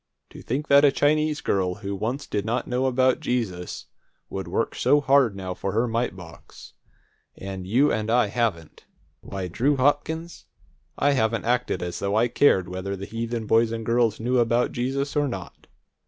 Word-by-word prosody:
To - - -11
think 140 +5 -3
that 140 +1 +6
a 145 - +6
Chinese 150 +2 +1
girl 90 -2 0
who 100 0 -5
once 120 +8 -3
did 105 - -2
not 120 +3 -1
know 125 +1 0
about 130 0 +2
Jesus, 95 -8 -3 0.5
would - - -4
work - - -1
so 145 - +3
hard 135 -6 +3
now 95 -1 -5
for 95 - -4
her 115 +3 +1
mite 115 -2 -1
box, 85 -2 -13 0.6
and 95 -1 -7
you 130 +9 +3
and 110 0 -2
I 120 +1 +4
haven't! 100 -7 -3 0.3
Why, 95 -2 -6
Drew 135 - +1
Hopkins, 150 +5 -1 0.5
I 145 - +3
haven't 115 -4 0
acted 120 -6 0
as 90 0 -4
though 100 +1 -1
I 115 +2 +3
cared 95 -9 +3
whether 95 +2 -4
the 95 0 -7
heathen 115 +1 -4
boys 115 +1 +3
and 115 -1 -4
girls 115 -2 +1
knew 125 +2 +1
about 120 +1 +2
Jesus 135 +4 -2
or 145 -1 +2
not! 125 - -8
115 Hz, 180 wpm, -24 LUFS, 100-130 Hz, 0.6 s, that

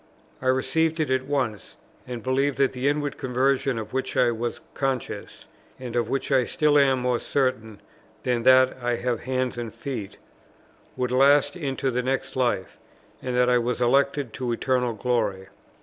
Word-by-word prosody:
I 130 - -3
received 155 +5 +1
it 155 -4 0
at 130 0 0
once, 125 -8 -2 0.3
and 120 -2 -6
believed 135 +2 +1
that 135 -1 +3
the 130 +2 -2
inward 145 0 -1
conversion 130 0 +1
of 110 0 -6
which 130 0 -2
I 120 - +4
was 115 +1 -3
conscious, 135 -2 -3 0.3
(and 125 -2 -6
of 120 - 0
which 135 +1 -2
I 130 -2 +4
still 150 +4 +3
am 135 -2 +4
more 125 -1 +1
certain 110 -6 -1 0.4
than 125 -2 0
that 130 +1 +5
I 120 0 0
have 120 -1 -2
hands 130 -1 -1
and 115 -2 -5
feet,) 115 -8 -6 0.8
would 125 -1 -1
last 140 +5 +4
into 135 -5 -2
the 125 +1 0
next 130 +1 -2
life, 120 -8 -1 0.4
and 125 -1 -3
that 125 0 +3
I 125 0 +4
was 120 +1 -2
elected 135 0 +2
to 125 -2 -3
eternal 125 0 0
glory. 105 -5 -1
130 Hz, 170 wpm, -25 LUFS, 120-135 Hz, 0.8 s, that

